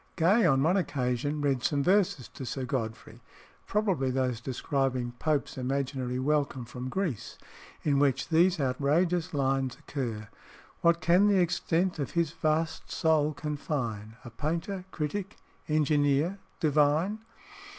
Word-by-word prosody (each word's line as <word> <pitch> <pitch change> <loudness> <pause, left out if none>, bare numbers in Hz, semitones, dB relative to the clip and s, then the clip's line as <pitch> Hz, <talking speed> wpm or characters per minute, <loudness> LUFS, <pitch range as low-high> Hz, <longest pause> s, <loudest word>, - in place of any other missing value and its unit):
Gay 185 +4 +4
on 135 -2 +3
one 175 +5 +3
occasion 145 -3 -1
read 135 -3 +1
some 140 +2 +1
verses 180 - +2
to - - -9
Sir 130 +1 -3
Godfrey 115 -2 -4 0.5
(probably 195 -11 +1
those 125 -2 -1
describing 130 -1 -1
Pope's 150 -4 -1
imaginary 130 -1 -2
welcome 140 -2 0
from 125 +2 -6
Greece) 175 - -3 0.5
in 140 -2 +2
which 140 0 +1
these 175 +2 +4
outrageous 150 +6 +1
lines 135 -2 0
occur 115 -7 -4 0.5
"What 170 0 +3
can 180 +4 +5
the 200 -2 +4
extent 175 0 +1
of 140 - -3
his 165 -3 +2
vast 160 0 -1
soul 155 -2 +2
confine 125 -8 -3
A 120 - -8
painter, 170 - -3
critic, 190 +5 -4 0.3
engineer, 150 +3 +2 0.2
divine?" 155 +7 +2
145 Hz, 130 wpm, -29 LUFS, 130-170 Hz, 0.5 s, can